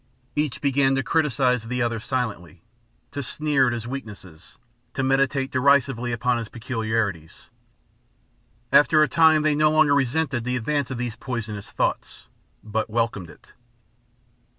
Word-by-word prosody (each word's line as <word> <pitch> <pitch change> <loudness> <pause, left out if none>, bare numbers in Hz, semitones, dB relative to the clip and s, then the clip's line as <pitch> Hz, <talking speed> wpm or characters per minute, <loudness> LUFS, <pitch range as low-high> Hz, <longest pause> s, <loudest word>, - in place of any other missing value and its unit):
Each 150 -3 -1
began 135 -1 +2
to 135 - 0
criticize 135 -6 +1
the 125 +1 -1
other 115 -1 -1
silently, 100 -8 -4 0.5
to 140 - -4
sneer 140 0 +1
at 120 - 0
his 120 -1 -5
weaknesses, 105 -10 -9 0.4
to 135 - -1
meditate 135 0 +1
derisively 130 -2 +2
upon 120 +1 0
his 115 -2 -6
peculiarities. 110 -8 -3 1.2
After 155 +1 +5
a - - +2
time 160 -1 +4
they 155 -1 +3
no 155 +1 +3
longer 155 -2 +4
resisted 135 -1 0
the 125 +1 -2
advance 140 +3 -1
of 130 - -4
these 120 -2 -4
poisonous 110 -5 -5
thoughts, - - -3 0.4
but 110 +1 -2
welcomed 110 -6 -2
it. - - -18
125 Hz, 140 wpm, -23 LUFS, 115-140 Hz, 1.2 s, After